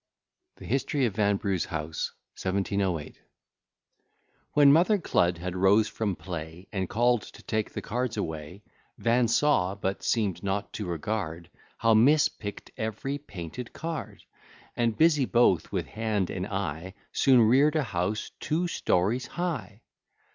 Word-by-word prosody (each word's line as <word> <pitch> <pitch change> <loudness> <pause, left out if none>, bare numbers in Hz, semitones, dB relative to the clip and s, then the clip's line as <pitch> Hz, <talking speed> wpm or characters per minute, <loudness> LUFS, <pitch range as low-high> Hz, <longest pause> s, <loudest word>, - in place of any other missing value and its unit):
] - - -57
THE - - -11
HISTORY 135 +2 0
OF 110 - -1
VANBRUGH'S 100 -3 +1
HOUSE 80 0 -4 0.3
1708 95 -3 -1 1.3
When 145 -1 +7
Mother 180 +7 +4
Cludd 90 - +1
had 90 +1 -5
rose 100 +4 +4
from 105 -4 -2
play, 85 0 -7
And 95 -3 -2
call'd 120 +2 +2
to - - -13
take 110 -1 -1
the - - -6
cards 120 0 -2
away, 80 +1 -5 0.3
Van 120 +1 +2
saw, 110 -7 +2
but 95 -1 -3
seem'd 100 -6 0
not 100 +2 -2
to 105 - -4
regard, 85 -1 -3 0.3
How 115 0 +3
Miss 140 +8 +5
pick'd 105 -1 -8
every 110 +6 -3
painted 100 - -8
card, 165 0 -6 0.5
And, 115 -2 0
busy 155 -4 +4
both 120 -8 +3
with - - -1
hand 110 -4 -2
and 95 +1 -3
eye, 95 -2 -4 0.2
Soon 130 -3 +5
rear'd 135 +7 +5
a 155 - +2
house 105 -1 -2
two 170 +4 0
stories 115 - 0
high. 155 - -4
105 Hz, 140 wpm, -28 LUFS, 95-125 Hz, 1.3 s, When